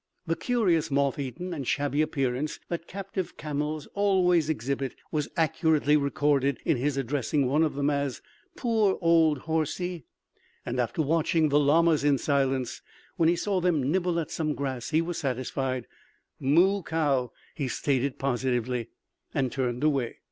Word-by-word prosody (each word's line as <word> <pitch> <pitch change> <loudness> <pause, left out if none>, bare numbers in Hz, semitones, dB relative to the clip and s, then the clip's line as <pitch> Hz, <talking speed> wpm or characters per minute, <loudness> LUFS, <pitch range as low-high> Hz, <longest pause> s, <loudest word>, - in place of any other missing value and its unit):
The 165 -1 0
curious 180 -11 +1
moth 140 0 +1
eaten 140 +7 -4
and 140 -6 -5
shabby 145 +1 +1
appearance 135 -1 -1
that 170 -1 -4
captive 195 -1 -5
camels 150 0 -3
always 180 -5 +3
exhibit 135 -1 -2 0.2
was 150 -2 -1
accurately 160 -2 +2
recorded 140 -1 +1
in - - +3
his 140 +3 -1
addressing 135 +1 0
one 140 +5 +2
of 155 -3 +1
them 140 +1 +1
as 140 -2 -1 0.4
"poor 220 -5 +1
old 165 -5 +3
horsie." 160 +2 -2 0.6
And 125 +1 -3
after 125 +6 0
watching 160 +1 +2
the 145 +1 +4
llamas 155 +1 +4
in 145 -1 +4
silence, 135 -3 0 0.4
when 165 -2 +4
he 175 - +3
saw 195 +1 -1
them 155 -6 +1
nibble 175 -1 +1
at 160 - -4
some 155 -2 -1
grass 130 -4 -3
he 160 +1 +2
was 170 0 -4
satisfied. 130 -1 -2 0.5
"Moo 175 +9 +3
cow," 145 -7 0 0.2
he 140 -5 -3
stated 135 +1 -1
positively, 125 -2 -1 0.5
and 130 -2 +1
turned 125 -1 -2
away. 140 -6 +1
150 Hz, 150 wpm, -27 LUFS, 135-165 Hz, 0.6 s, the